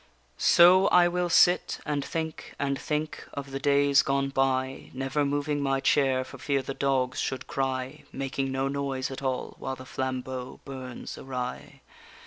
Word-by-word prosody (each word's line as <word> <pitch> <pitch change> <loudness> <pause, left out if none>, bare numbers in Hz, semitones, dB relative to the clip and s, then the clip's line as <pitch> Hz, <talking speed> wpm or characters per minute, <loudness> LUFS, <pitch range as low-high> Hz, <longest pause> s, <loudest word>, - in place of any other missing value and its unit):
_ - - -30 0.3
So 180 - +6
I 175 -1 +6
will 175 0 -1
sit, 175 +1 +4
and 145 -2 -1
think 160 0 -5
and 140 -1 -1
think 150 0 -3
of 140 -1 -6
the 135 - -3
days 140 0 +4
gone 135 0 0
by, 135 -1 0
Never 135 +3 0
moving 145 +1 -1
my 135 -1 +1
chair 135 -1 +2
for 135 +1 -12
fear 140 0 0
the 135 - -4
dogs 130 -2 0
should 130 -1 -2
cry, 135 +2 -3
Making 135 0 -3
no 135 +1 0
noise 135 -1 -2
at 135 - -6
all 130 -2 -2
while 130 - -4
the 130 0 -11
flambeau 130 -1 -4
burns 130 -2 -7
awry. 125 -2 -6
135 Hz, 165 wpm, -27 LUFS, 130-145 Hz, 0.3 s, So